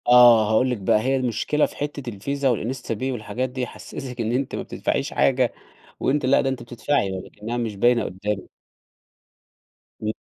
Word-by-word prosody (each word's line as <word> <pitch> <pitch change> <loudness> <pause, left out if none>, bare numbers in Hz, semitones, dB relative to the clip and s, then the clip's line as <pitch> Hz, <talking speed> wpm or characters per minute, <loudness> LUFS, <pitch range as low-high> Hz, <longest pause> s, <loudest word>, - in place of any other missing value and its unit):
آه 120 -3 +8
هأقول 125 +4 +3
لِك 125 - -1
بقى، 100 +1 +2
هي 135 +3 +1
المشكلة 130 +4 +1
في - - -9
حتة 145 -3 -4
الفيزا 130 +5 0
والInstaPay 115 -1 -4
والحاجات 120 +2 -3
دي 130 +1 -5
يحسّسِك 125 +1 -6
إن 110 0 -1
أنتِ 130 +2 -1
ما - - -3
بتدفعيش - - -2
حاجة، 130 -2 +2 0.5
وأنتِ 145 0 +1
لأ 130 +2 +4
ده 135 - 0
أنتِ 130 -2 -4
بتدفعي، 120 -2 0
لكنّها 105 +5 -5
مش 115 -3 -2
باينة 120 +3 +3
قدامِك. 100 +2 -3 1.5
امم. 110 - -1
120 Hz, 165 wpm, -23 LUFS, 110-130 Hz, 1.5 s, آه